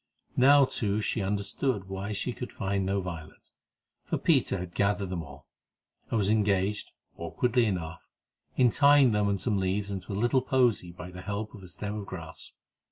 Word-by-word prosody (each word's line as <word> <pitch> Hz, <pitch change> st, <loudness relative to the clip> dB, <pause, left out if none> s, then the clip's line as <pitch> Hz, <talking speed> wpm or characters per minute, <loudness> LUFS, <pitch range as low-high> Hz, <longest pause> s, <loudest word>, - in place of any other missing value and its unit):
Now, 140 Hz, +2 st, +7 dB
too, 105 Hz, -5 st, -1 dB
she 110 Hz, +1 st, -1 dB
understood 100 Hz, +2 st, -1 dB
why 95 Hz, +2 st, -4 dB
she 115 Hz, +4 st, -2 dB
could 125 Hz, -, -7 dB
find 100 Hz, -2 st, -1 dB
no 100 Hz, 0 st, 0 dB
violets, 85 Hz, -4 st, -9 dB, 0.5 s
for -, -, -2 dB
Peter -, -, +2 dB
had 90 Hz, -1 st, -6 dB
gathered 100 Hz, -1 st, 0 dB
them 90 Hz, -2 st, -2 dB
all, 70 Hz, -3 st, -12 dB, 0.6 s
and 115 Hz, -, 0 dB
was 100 Hz, -3 st, +1 dB
engaged, 105 Hz, -1 st, +1 dB, 0.3 s
awkwardly 120 Hz, +8 st, +1 dB
enough, 80 Hz, -6 st, -3 dB, 0.6 s
in 125 Hz, -2 st, +5 dB
trying 140 Hz, -1 st, +6 dB
to -, -, 0 dB
tie 105 Hz, -, +1 dB
them 100 Hz, -1 st, +2 dB
and 100 Hz, -1 st, 0 dB
some 100 Hz, +1 st, 0 dB
leaves 100 Hz, +2 st, -1 dB
into 95 Hz, +1 st, -5 dB
a -, -, -2 dB
little 120 Hz, +4 st, +2 dB
posy 125 Hz, -9 st, +1 dB
by 90 Hz, +1 st, -9 dB
the 90 Hz, 0 st, -9 dB
help 105 Hz, +2 st, -4 dB
of 105 Hz, -, -11 dB
a 95 Hz, -, -11 dB
stem 100 Hz, +3 st, -5 dB
of 100 Hz, -, -8 dB
grass. 85 Hz, -3 st, -8 dB
100 Hz, 190 wpm, -28 LUFS, 95-110 Hz, 0.6 s, Now